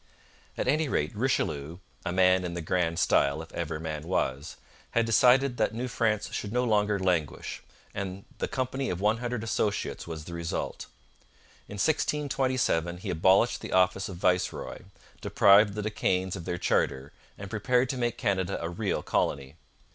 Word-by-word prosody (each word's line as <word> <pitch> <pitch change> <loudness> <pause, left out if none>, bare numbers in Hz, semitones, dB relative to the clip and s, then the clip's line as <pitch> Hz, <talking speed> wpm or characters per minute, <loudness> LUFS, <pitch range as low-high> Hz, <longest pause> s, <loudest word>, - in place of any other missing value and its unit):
At - - -2
any 150 +2 +2
rate 75 -1 -1
Richelieu, 85 - -1 0.3
'a - - 0
man 90 0 +4
in 90 -1 -4
the 85 - -3
grand 85 0 0
style, 70 -1 +2
if 80 - -15
ever 80 -2 -4
man 80 -2 -4
was,' 75 -5 -1 0.4
had 115 - +4
decided 125 +3 +4
that 110 0 0
New 125 +2 -2
France 110 -3 -1
should 105 - -3
no 125 +2 +1
longer 105 -3 +2
languish, 90 -6 -1 0.3
and 95 0 -5
the - - -1
Company 130 +1 -2
of 90 - -3
One 105 +3 +2
Hundred 120 -2 -3
Associates 105 -5 -2
was 80 -2 -6
the 85 - -8
result. 85 -1 -4 0.8
In 105 - -7
1627 130 - 0
he 90 - -4
abolished 95 +8 +3
the - - -6
office 95 +1 +2
of 95 - -7
viceroy, 90 0 0 0.4
deprived 100 +1 +5
the 105 - -3
De 110 - -2
Caens 95 -2 0
of 85 -4 -7
their 90 - -2
charter, 65 -4 0 0.2
and 100 0 -8
prepared 125 +4 +2
to 130 - -2
make 120 -1 -1
Canada 95 -5 0
a 85 - -3
real 100 +3 -2
colony. 70 -1 -1
95 Hz, 170 wpm, -28 LUFS, 85-115 Hz, 0.8 s, deprived